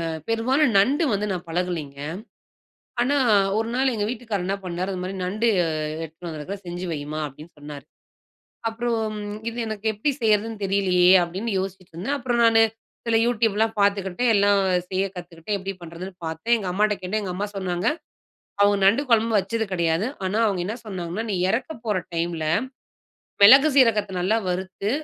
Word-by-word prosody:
அ -, -, -2 dB, 0.2 s
பெரும்பாலும் 255 Hz, +6 st, +2 dB
நண்டு 275 Hz, -, +3 dB
வந்து 205 Hz, +1 st, 0 dB
நான் 180 Hz, -1 st, -5 dB
பழகலேங்க. 165 Hz, -5 st, -3 dB, 1.0 s
ஆனா, 275 Hz, +4 st, +2 dB, 0.4 s
ஒரு 225 Hz, +1 st, -1 dB
நாள் 260 Hz, 0 st, +2 dB
எங்க 210 Hz, -2 st, -1 dB
வீட்டுக்காரர் 225 Hz, -6 st, -3 dB
என்னா 195 Hz, +1 st, 0 dB
பண்ணாரு, 180 Hz, +2 st, -3 dB
"இதுமாரி 185 Hz, +1 st, -4 dB
நண்டு 215 Hz, +6 st, 0 dB, 0.2 s
அ -, -, -1 dB, 0.4 s
எடுத்துன்னு 165 Hz, +2 st, -9 dB
வந்திருக்குறேன். 165 Hz, +6 st, -7 dB
செஞ்சு 175 Hz, +1 st, -5 dB
வைம்மா." 150 Hz, 0 st, -4 dB
அப்பிடீன்னு 150 Hz, +4 st, -13 dB
சொன்னாரு. 145 Hz, -1 st, -9 dB, 0.8 s
அப்புறம், 225 Hz, -2 st, -2 dB, 0.3 s
"இது 235 Hz, -, -9 dB
எனக்கு 215 Hz, 0 st, -5 dB
எப்பிடி 220 Hz, +8 st, -1 dB
செய்றதுன்னு 215 Hz, 0 st, +1 dB
தெரியலயே!" 185 Hz, -2 st, +4 dB
அப்பிடீன்னு 190 Hz, +6 st, -3 dB
யோசிச்சிட்டுருந்தேன். 190 Hz, -, -4 dB
அப்பறம் 240 Hz, -2 st, +1 dB
நானு 225 Hz, 0 st, +5 dB, 0.4 s
சில 225 Hz, -1 st, +3 dB
YouTubeலாம் 225 Hz, -2 st, +1 dB
பார்த்துக்கிட்டேன். 200 Hz, +3 st, +2 dB
எல்லாம் 200 Hz, 0 st, +4 dB, 0.3 s
செய்ய 190 Hz, 0 st, +1 dB
கத்துக்கிட்டேன். 175 Hz, +2 st, -5 dB
எப்பிடி 195 Hz, +1 st, -5 dB
பண்ணுறதுன்னு 170 Hz, +3 st, -8 dB
பார்த்தேன். 160 Hz, +9 st, 0 dB
எங்க 200 Hz, -4 st, -4 dB
அம்மாட்ட 210 Hz, +2 st, +2 dB
கேட்டேன். 210 Hz, +4 st, -1 dB
எங்க 190 Hz, -2 st, -4 dB
அம்மா 200 Hz, +3 st, -2 dB
சொன்னாங்க, 180 Hz, 0 st, -2 dB, 0.8 s
அவுங்க 205 Hz, 0 st, +4 dB
நண்டு 225 Hz, +9 st, +4 dB
கொழம்பு 225 Hz, -1 st, +3 dB
வச்சது 220 Hz, +4 st, -1 dB
கெடையாது. 170 Hz, +3 st, +1 dB, 0.2 s
ஆனா, 205 Hz, +4 st, -1 dB
அவங்க 190 Hz, -3 st, -1 dB
என்ன 220 Hz, -, -3 dB
சொன்னாங்கன்னா, 185 Hz, +1 st, -4 dB
"நீ -, -, 0 dB
இறக்கப் 250 Hz, +3 st, -3 dB
போற 210 Hz, -4 st, +1 dB, 0.2 s
டைம்ல 165 Hz, -1 st, -1 dB, 1.0 s
மிளகு 270 Hz, +8 st, +8 dB
சீரகத்த 220 Hz, -6 st, +4 dB
நல்லா 215 Hz, +5 st, +2 dB
வறுத்து, 190 Hz, +3 st, -3 dB
200 Hz, 155 wpm, -24 LUFS, 180-225 Hz, 1.0 s, மிளகு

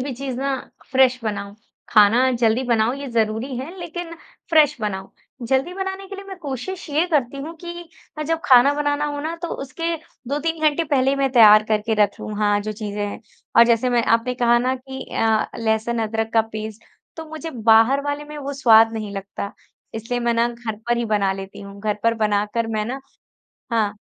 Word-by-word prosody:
भी 270 Hz, +1 st, -3 dB
चीज 265 Hz, -1 st, -5 dB
ना 275 Hz, 0 st, -1 dB, 0.3 s
फ्रेश 260 Hz, -1 st, +4 dB
बनाऊँ, 200 Hz, -1 st, -4 dB, 0.3 s
खाना 235 Hz, +4 st, +5 dB
जल्दी 235 Hz, 0 st, +2 dB
बनाऊँ 235 Hz, 0 st, +2 dB
ये 280 Hz, 0 st, -6 dB
ज़रूरी 225 Hz, +3 st, -1 dB
है 300 Hz, +9 st, -6 dB
लेकिन 345 Hz, 0 st, -6 dB, 0.4 s
फ्रेश 300 Hz, -3 st, +5 dB
बनाऊँ। 190 Hz, -2 st, -4 dB, 0.4 s
जल्दी 270 Hz, +7 st, +1 dB
बनाने 385 Hz, 0 st, -4 dB
के 395 Hz, -, -7 dB
लिए 395 Hz, -, -9 dB
मैं 385 Hz, -, -7 dB
कोशिश 310 Hz, +5 st, -6 dB
ये 310 Hz, +4 st, +2 dB
करती 280 Hz, -6 st, 0 dB
हूँ 325 Hz, +3 st, -7 dB
कि 345 Hz, 0 st, -8 dB, 0.3 s
अ, -, -, -1 dB
जब 325 Hz, +2 st, -1 dB
खाना 260 Hz, -1 st, +6 dB
बनाना 290 Hz, 0 st, 0 dB
हो 290 Hz, -1 st, -3 dB
ना 315 Hz, +3 st, -3 dB
तो 340 Hz, -, -2 dB, 0.2 s
उसके 330 Hz, +5 st, -3 dB, 0.3 s
2-3 320 Hz, +3 st, -2 dB
घंटे 305 Hz, +3 st, -1 dB
पहले 270 Hz, -3 st, +2 dB
ही 275 Hz, -, 0 dB
मैं 275 Hz, -1 st, +1 dB
तैयार 215 Hz, -3 st, +8 dB
करके 215 Hz, +1 st, +1 dB
रखूँ 205 Hz, +1 st, -2 dB
हाँ, 205 Hz, -1 st, +2 dB
जो 215 Hz, +1 st, -4 dB
चीज़ें 210 Hz, -1 st, -4 dB
हैं। 205 Hz, -, -7 dB, 0.4 s
और 235 Hz, -, +9 dB
जैसे 235 Hz, +1 st, +2 dB
मैं 240 Hz, -1 st, +3 dB
आपने 230 Hz, +2 st, +1 dB
कहा 240 Hz, -1 st, +3 dB
ना 255 Hz, +2 st, 0 dB
कि 265 Hz, +1 st, -8 dB
अ, 220 Hz, -1 st, +2 dB
लहसुन-अदरक 225 Hz, 0 st, -1 dB
का 225 Hz, -, +5 dB
पेस्ट 215 Hz, 0 st, -6 dB, 0.3 s
तो 320 Hz, -, -6 dB
मुझे 315 Hz, +1 st, -6 dB, 0.2 s
बाहर 225 Hz, +5 st, +6 dB
वाले 290 Hz, +1 st, -3 dB
में 300 Hz, 0 st, -9 dB
वो 280 Hz, -1 st, -5 dB
स्वाद 225 Hz, -4 st, +5 dB
नहीं 215 Hz, -2 st, -5 dB
लगता 200 Hz, 0 st, -6 dB, 0.4 s
इसलिए 230 Hz, +2 st, -3 dB
मैं 235 Hz, 0 st, +1 dB
ना 230 Hz, +1 st, +2 dB
घर 235 Hz, -2 st, -6 dB
पर 240 Hz, -, +3 dB
ही 235 Hz, -, -1 dB
बना 205 Hz, -3 st, +1 dB
लेती 195 Hz, 0 st, -8 dB
हूँ। 200 Hz, 0 st, -10 dB
घर 210 Hz, 0 st, 0 dB
पर 230 Hz, 0 st, +3 dB
बनाकर 210 Hz, +1 st, 0 dB
मैं 215 Hz, -, 0 dB
ना 260 Hz, +5 st, -5 dB, 0.7 s
हाँ। 215 Hz, -2 st, 0 dB
240 Hz, 195 wpm, -21 LUFS, 220-285 Hz, 0.7 s, और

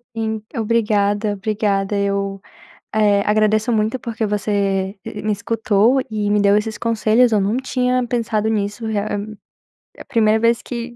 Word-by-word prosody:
Sim, 220 Hz, -1 st, -2 dB
obrigada, 210 Hz, -2 st, +1 dB
obrigada. 205 Hz, -1 st, -1 dB
Eu, 200 Hz, -1 st, -2 dB, 0.5 s
eh, 205 Hz, -2 st, +3 dB
agradeço 215 Hz, +2 st, +2 dB
muito 220 Hz, +2 st, 0 dB
porque 230 Hz, -3 st, -3 dB
você, 200 Hz, -2 st, -1 dB
e -, -, -7 dB
e -, -, -5 dB
me 215 Hz, -, 0 dB
escutou 225 Hz, +3 st, +1 dB
e 210 Hz, -1 st, -1 dB
me 205 Hz, 0 st, +2 dB
deu 200 Hz, 0 st, +4 dB
esses 220 Hz, +1 st, -3 dB
conselhos. 230 Hz, +1 st, +2 dB
Eu 215 Hz, -, +3 dB
num 200 Hz, +3 st, 0 dB
tinha 255 Hz, -1 st, 0 dB
pensado 225 Hz, -3 st, -1 dB
nisso, 210 Hz, +1 st, -2 dB
realm 210 Hz, 0 st, -3 dB, 0.6 s
é -, -, -11 dB
a -, -, -36 dB
primeira 220 Hz, -2 st, +2 dB
vez 230 Hz, +1 st, +2 dB
que 240 Hz, -1 st, -6 dB
215 Hz, 160 wpm, -19 LUFS, 205-230 Hz, 0.6 s, deu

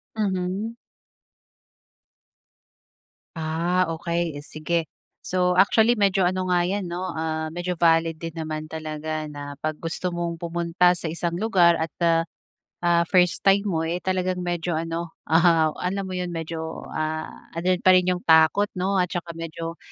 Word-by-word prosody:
Mhm. 195 Hz, +2 st, -2 dB, 2.6 s
Ah, 170 Hz, +3 st, +1 dB
okey, 170 Hz, 0 st, -2 dB
eh, -, -, -7 dB
sige. 160 Hz, +1 st, -2 dB, 0.3 s
So, 180 Hz, 0 st, +1 dB
actually 220 Hz, +5 st, +5 dB
medyo 195 Hz, -2 st, +3 dB
ano 185 Hz, +1 st, 0 dB
nga 175 Hz, -1 st, +3 dB
'yan 195 Hz, 0 st, -2 dB
'no, 180 Hz, +1 st, -3 dB
ah, 160 Hz, 0 st, -2 dB
medyo 175 Hz, +1 st, -3 dB
valid 165 Hz, -1 st, +3 dB
din 165 Hz, 0 st, -6 dB
naman 155 Hz, -1 st, -4 dB
talaga 155 Hz, 0 st, -4 dB
na 145 Hz, -1 st, -7 dB
'pag 155 Hz, 0 st, -2 dB
gusto 170 Hz, +2 st, -3 dB
mong 170 Hz, -1 st, -3 dB
pumunta 170 Hz, +1 st, +2 dB
sa -, -, -7 dB
isang 170 Hz, +1 st, -2 dB
lugar 180 Hz, -5 st, +4 dB
at 160 Hz, 0 st, -3 dB, 0.9 s
ah, 170 Hz, 0 st, +4 dB
first 180 Hz, -2 st, +3 dB
time 195 Hz, +1 st, +5 dB
mo 165 Hz, -3 st, 0 dB
eh 175 Hz, +2 st, -2 dB
talagang 185 Hz, -1 st, -1 dB
medyo 175 Hz, -1 st, -2 dB
ano 165 Hz, +1 st, -3 dB, 0.2 s
ah, 165 Hz, -1 st, +5 dB
alam 195 Hz, +2 st, -1 dB
mo 185 Hz, -, -6 dB
'yon 180 Hz, 0 st, -2 dB
medyo 160 Hz, 0 st, -5 dB
ah 155 Hz, 0 st, -2 dB, 0.3 s
ando'n 180 Hz, +2 st, +1 dB
pa 185 Hz, -, +7 dB
rin 180 Hz, 0 st, +4 dB
'yong 180 Hz, 0 st, -2 dB
takot 160 Hz, +5 st, +5 dB
'no? 195 Hz, +2 st, 0 dB
At 180 Hz, -1 st, 0 dB
saka 175 Hz, -1 st, -4 dB
medyo 165 Hz, +1 st, -6 dB
170 Hz, 150 wpm, -24 LUFS, 160-180 Hz, 2.6 s, pa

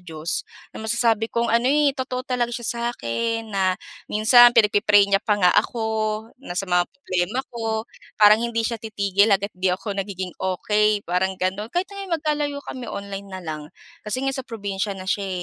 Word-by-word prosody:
Diyos. 165 Hz, -2 st, -3 dB, 0.3 s
Na -, -, -8 dB
masasabi 225 Hz, 0 st, +1 dB
kong 235 Hz, 0 st, 0 dB
ano, 235 Hz, +2 st, +3 dB
eh, 290 Hz, 0 st, +3 dB
totoo 260 Hz, -1 st, -4 dB
talaga 250 Hz, -2 st, 0 dB
siya 240 Hz, 0 st, -5 dB, 0.2 s
sa'kin, 225 Hz, -, -2 dB
na 190 Hz, -2 st, +1 dB, 0.3 s
minsan 240 Hz, +3 st, +6 dB
pinagpi-pray 205 Hz, -2 st, +5 dB
niya 195 Hz, 0 st, +2 dB
pa 210 Hz, -2 st, +1 dB
nga 180 Hz, -3 st, +4 dB
ako, 230 Hz, -3 st, +1 dB, 0.6 s
na 180 Hz, -9 st, -7 dB
sa 195 Hz, -, 0 dB
mga 180 Hz, -1 st, +1 dB
problema 225 Hz, -2 st, -2 dB
ko. 225 Hz, -1 st, -2 dB, 0.3 s
Parang 210 Hz, +1 st, +7 dB
hindi 230 Hz, -1 st, -1 dB
siya 230 Hz, -1 st, -2 dB
titigil 200 Hz, -2 st, +1 dB
hanggat 200 Hz, 0 st, +1 dB
'di 185 Hz, +1 st, -1 dB
ako 185 Hz, +3 st, -2 dB
nagiging 190 Hz, -2 st, -5 dB
okey, 210 Hz, +3 st, +1 dB
parang 185 Hz, +2 st, 0 dB
gano'n. 190 Hz, +4 st, -2 dB
Kahit 360 Hz, +9 st, -2 dB
ngayon 390 Hz, -4 st, -3 dB
magkalayo 295 Hz, -2 st, -1 dB
kami 250 Hz, -3 st, -7 dB
online 200 Hz, -1 st, -6 dB
na 190 Hz, -1 st, -7 dB
lang, 155 Hz, -1 st, -5 dB, 0.4 s
kasi 235 Hz, +6 st, -3 dB
ngayon 270 Hz, 0 st, -1 dB
sa 265 Hz, -, -14 dB
probinsiya 200 Hz, -2 st, -3 dB
na 185 Hz, -, -8 dB
siya, 195 Hz, +1 st, -1 dB
210 Hz, 180 wpm, -23 LUFS, 190-240 Hz, 0.6 s, Parang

